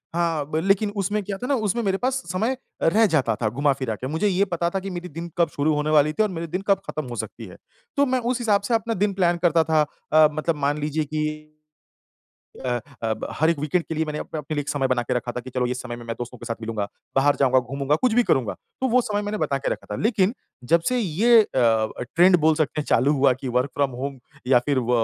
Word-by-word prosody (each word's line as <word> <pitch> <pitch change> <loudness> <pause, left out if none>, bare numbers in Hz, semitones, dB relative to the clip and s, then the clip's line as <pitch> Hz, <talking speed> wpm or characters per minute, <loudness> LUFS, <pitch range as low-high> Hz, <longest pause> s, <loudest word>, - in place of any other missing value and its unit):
हाँ 165 -4 0
ब 155 - 0
लेकिन 200 +2 +2
उसमें 205 +2 0
क्या 200 0 -4
था 250 - -5
ना 280 - +2
उसमें 235 +4 0
मेरे 195 -2 +1
पास 255 +3 0 0.2
समय 225 +8 0 0.3
रह 220 +7 +4
जाता 130 -8 +2
था, 110 - +2
घुमा-फिरा 130 -2 0
के 125 - -6
मुझे 160 +8 0
ये 195 +1 +2
पता 170 -2 -1
था 195 +2 -2
कि 195 +1 -6
मेरी 180 0 -6
दिन 165 +3 -7
कब 170 -2 +3
शुरू 150 +1 0
होने 150 +1 -1
वाली 150 0 +4
थी 215 - +2
और 215 - 0
मेरे 170 -2 -5
दिन 185 +4 -3
कब 195 -1 +3
खत्म 155 -1 -3
हो 120 - -6
सकती - - -6
है। - - -12 0.4
तो 285 - +5
मैं 260 -1 +1
उस 245 +1 -1
हिसाब 210 -4 +2
से 200 - -2
अपना 230 0 +1
दिन 200 +1 0
प्लान 175 -2 +2
करता 165 -1 +4
था 160 -1 +2 0.3
अ, 155 -1 +8
मतलब 155 +2 -1
मान 145 0 0
लीजिए 150 +1 -1
कि 155 +1 -1 1.4
अ 130 - -1 0.3
अ, 110 - 0
ब 110 - -6
हर 160 +2 +4
एक 165 - -1
वीकेंड 150 +4 0
के 160 - -5
लिए 160 +1 0
मैंने 150 -1 -4
आप - - -6
अपने 155 +1 -4
लिए 145 - 0
एक 140 - -7
समय 135 -2 0
बना 125 -2 +1
के 125 - -2
रखा 120 0 -2
था 125 - -4
कि 130 +1 -10
चलो 125 0 0
इस 125 +1 -3
समय 120 - -6
में 120 - -10
मैं 115 - -3
दोस्तों 120 0 -7
के 120 - -10
साथ 115 - -2
मिलूँगा। 110 -2 -3 0.3
बाहर 145 +1 +4
जाऊँगा, 130 -1 +4
घूमूँगा 135 +3 -1
कुछ 250 - +3
भी 245 - +5
करूँगा, 130 - +1 0.3
तो 260 - +1
वो 255 +2 +4
समय 210 -4 -2
मैंने 210 +1 -3
बता 145 -3 0
के - - -2
रखा - - -7
था। - - -3
लेकिन 215 -1 +2 0.4
जब 170 - +6
से 250 - +1
ये 225 +4 +4
अ, - - -6 0.7
ट्रेंड 180 +2 +7
बोल 155 +1 +4
सकते 155 0 -1
हैं - - -4
चालू 135 +5 +3
हुआ 135 -2 +4
कि 130 +1 -6
वर्क 125 +3 0
फ्रॉम 140 -1 +1
होम 140 -1 -4 0.3
या 125 -1 +5
फिर 140 -2 +2
व 120 -1 -1
155 Hz, 265 wpm, -23 LUFS, 135-195 Hz, 1.4 s, अ